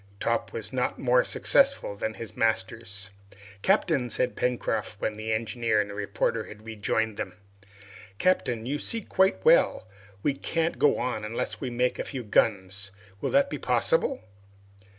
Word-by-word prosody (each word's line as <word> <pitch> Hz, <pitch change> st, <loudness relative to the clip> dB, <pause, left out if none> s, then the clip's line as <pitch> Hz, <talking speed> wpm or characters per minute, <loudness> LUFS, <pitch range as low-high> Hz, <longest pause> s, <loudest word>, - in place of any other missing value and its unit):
Top 115 Hz, 0 st, 0 dB
was 110 Hz, +1 st, -6 dB
not 125 Hz, -1 st, 0 dB
more 125 Hz, -1 st, +4 dB
successful 275 Hz, -, +2 dB
than 110 Hz, +2 st, -3 dB
his 115 Hz, -4 st, -8 dB
masters. 110 Hz, -3 st, -1 dB, 0.5 s
"Captain," 155 Hz, -, +2 dB
said 125 Hz, -, -1 dB
Pencroft, 115 Hz, -4 st, -1 dB
when 110 Hz, -, -1 dB
the 110 Hz, +1 st, -4 dB
engineer 115 Hz, 0 st, +1 dB
and 100 Hz, -1 st, -1 dB
the -, -, -7 dB
reporter 105 Hz, +2 st, -1 dB
had 105 Hz, +1 st, -12 dB
rejoined 110 Hz, 0 st, -1 dB
them, -, -, -4 dB, 0.8 s
"Captain, 120 Hz, -, +1 dB
you 145 Hz, +4 st, -2 dB
see 230 Hz, +7 st, -2 dB
quite 190 Hz, -, +2 dB
well -, -, +5 dB, 0.4 s
we 145 Hz, -, +2 dB
can't 165 Hz, +4 st, -1 dB
get 145 Hz, -, +4 dB
on 120 Hz, -4 st, -2 dB
unless 105 Hz, +2 st, -3 dB
we 130 Hz, -, -2 dB
make 125 Hz, +1 st, 0 dB
a -, -, 0 dB
few 130 Hz, -3 st, -5 dB
guns. 100 Hz, -2 st, +1 dB, 0.3 s
Will -, -, 0 dB
that 280 Hz, 0 st, +4 dB
be -, -, -3 dB
possible?" 485 Hz, -, +1 dB
115 Hz, 155 wpm, -27 LUFS, 110-135 Hz, 0.8 s, well